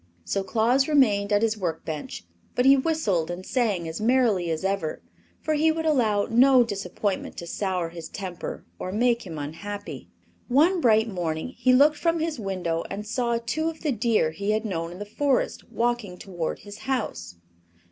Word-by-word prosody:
So 195 - -1
Claus 235 +7 +2
remained 215 -9 +3
at 205 +1 +3
his 220 -1 +1
work 175 -4 -3
bench; 150 - -6 0.3
but 250 - +2
he 270 +1 +8
whistled 260 - 0
and 175 +1 -5
sang 210 -10 0
as 160 +6 -5
merrily 225 -7 +2
as 160 +3 -2
ever, 195 -5 -2 0.4
for 310 - 0
he 310 +1 +3
would 320 0 -3
allow 225 -9 +2
no 250 +2 +6
disappointment 200 -2 -3
to 170 - -6
sour 180 -1 -2
his 165 -1 -8
temper 185 -4 -6
or 185 - -4
make 235 +1 +1
him 165 -3 -6
unhappy. 165 +8 -6 0.4
One 325 +8 +3
bright 220 -3 +4
morning 170 -3 -3
he 255 0 +1
looked 290 +4 +5
from 335 -1 +1
his 320 -4 -2
window 180 -5 -2
and 205 +2 -5
saw 235 +1 0
two 315 +7 0
of 320 - -9
the 305 - 0
deer 220 -8 +1
he 200 +6 -4
had 215 +1 -1
known 165 -5 -3
in 175 - -9
the 205 - -6
Forest 270 +5 -1
walking 235 -6 -1
toward 175 -5 -4
his 205 +1 -10
house. 215 - -3
210 Hz, 180 wpm, -25 LUFS, 180-255 Hz, 0.4 s, he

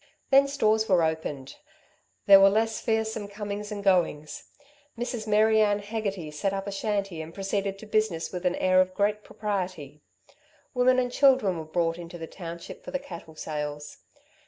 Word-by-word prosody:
Then 275 +1 +6
stores 220 -6 +1
were 180 -3 +4
opened. 155 -4 -3 0.7
There 195 -1 +9
were 195 0 +7
less 220 +2 0
fearsome 220 -2 -1
comings 205 +1 -6
and 205 -1 -5
goings. 170 -6 +1 0.5
Mrs. 240 -2 -4
Mary 215 +1 +4
Ann 205 -1 +3
Hegarty 205 -6 -4
set 190 +6 -2
up 195 0 -3
a 200 - -4
shanty 195 -4 -2
and 160 +1 -8
proceeded 195 0 -2
to 220 - -11
business 215 -6 0
with 180 0 -4
an 180 -1 +1
air 185 0 +4
of 185 0 -2
great 210 +1 0
propriety. 185 -8 -4 0.7
Women 255 0 +4
and 250 -1 +1
children 255 - +3
were 160 - -6
brought 165 +1 -1
into 175 0 -8
the 165 - -6
township 170 0 -9
for - - -8
the 275 - -1
cattle 170 -9 -10
sales. 150 -1 -5
195 Hz, 170 wpm, -27 LUFS, 170-215 Hz, 0.7 s, There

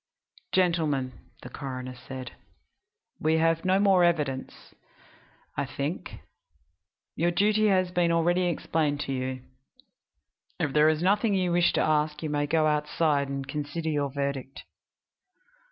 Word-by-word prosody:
"Gentlemen," 155 -9 +1 0.2
the 125 - -8
coroner 130 -2 -6
said, 130 0 -8 0.9
"we 160 +1 +2
have 165 0 +2
no 185 +1 +3
more 195 -3 +4
evidence, 150 -6 -1 0.8
I - - -2
think. - - -5 0.9
Your 170 +2 +1
duty 210 +4 +2
has 185 -3 +2
been 175 -1 +2
already 175 +2 +2
explained 155 -3 0
to 135 - -3
you; 130 0 -3 1.2
if 150 -5 -1
there 150 +1 +5
is 155 +1 0
nothing 205 +2 +2
you 180 -2 +1
wish 175 0 +3
to - - +2
ask 150 0 +1
you 155 - -2
may 145 0 0
go 160 +1 +2
outside 150 -1 +1
and 135 -1 -4
consider 150 +3 -3
your 145 -2 0
verdict." 140 -1 -4
155 Hz, 135 wpm, -27 LUFS, 140-175 Hz, 1.2 s, there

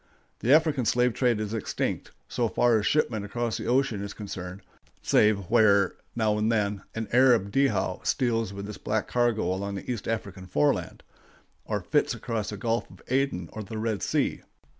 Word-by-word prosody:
The 125 - +1
African 150 -4 +4
slave 125 +2 +2
trade 120 -3 +1
is 105 0 -3
extinct, 110 - -2 0.2
so 120 -2 -1
far 120 -1 +3
as 105 - -1
shipment 115 -8 +1
across 115 +2 -2
the - - -5
ocean 125 -4 +1
is 100 0 -6
concerned, 95 -2 -7 0.4
save 105 -1 +4
where, 100 -5 +5 0.2
now 110 -2 +1
and 110 +2 +2
then, 105 -3 0
an 115 -1 -3
Arab 120 -5 +4
dhow 135 +4 +1
steals 115 -6 0
with 100 0 -6
its 105 - -8
black 105 0 -1
cargo 120 -3 +1
along 100 +1 -3
the 100 - -5
East 115 -5 -4
African 100 -4 -4
foreland, 75 -5 0 0.6
or - - -2
flits - - +1
across 110 -2 -3
the 105 - -5
Gulf 115 +3 -1
of - - -16
Aden 130 -9 0
or 110 - -5
the 110 +2 -7
Red 110 -2 -2
Sea. - - 0
110 Hz, 180 wpm, -27 LUFS, 100-120 Hz, 0.6 s, where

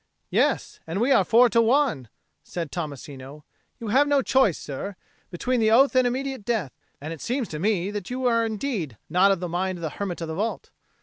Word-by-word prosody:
"Yes; - - +1
and 165 +4 -2
we 245 +5 +2
are 195 - +5
four 235 +6 +5
to 230 - +4
one," 230 - +2 0.3
said 170 -4 -5
Tommasino. 145 -3 -7 0.4
"You 225 - -5
have 275 +6 +4
no 285 -2 +3
choice, 260 - +3
sir, 165 +8 -6 0.3
between 245 +8 -1
the 220 -1 +3
oath 260 +5 +5
and 255 -1 +4
immediate 265 -1 -3
death. 210 - -1 0.3
And 155 +3 -5
it 160 - -10
seems 250 -1 -2
to 155 - -5
me 195 0 0
that 205 -3 -5
you 255 +1 -3
are 230 -2 +3
indeed 210 - -3
not 185 +3 +5
of 195 - +1
the 180 - -2
mind 180 +2 -2
of 170 - -9
the 160 - -2
hermit 190 -4 -3
of 165 - -3
the 160 - -4
vault." 210 +7 -3
205 Hz, 210 wpm, -25 LUFS, 165-245 Hz, 0.4 s, are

